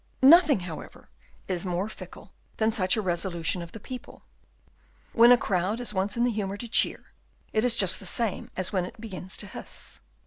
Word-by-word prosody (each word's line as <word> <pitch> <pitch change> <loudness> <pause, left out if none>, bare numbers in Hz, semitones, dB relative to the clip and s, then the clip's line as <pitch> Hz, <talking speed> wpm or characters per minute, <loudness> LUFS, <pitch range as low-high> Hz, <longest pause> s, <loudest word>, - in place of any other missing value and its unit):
Nothing 300 - +7
however, 175 -3 -9 0.4
is 180 -3 -1
more 180 +1 -1
fickle 220 - -11 0.2
than 220 0 +2
such 195 -3 +2
a 215 - -1
resolution 175 -1 -1
of 170 -1 -9
the 225 - -9
people. 250 +4 -9 0.9
When 235 +1 +7
a 245 - +8
crowd 200 +1 -1
is 245 -3 -2
once 195 +2 -1
in 235 - +2
the 245 - +2
humour 200 -2 -3
to 235 - -6
cheer, 230 - +1 0.4
it 215 - +2
is 245 -2 +3
just 195 -5 +3
the 195 - -7
same 225 +1 -1
as 185 +1 0
when 185 -2 +1
it 225 +6 -11
begins 190 -4 -7
to - - -3
hiss. - - -7
205 Hz, 195 wpm, -27 LUFS, 185-230 Hz, 0.9 s, a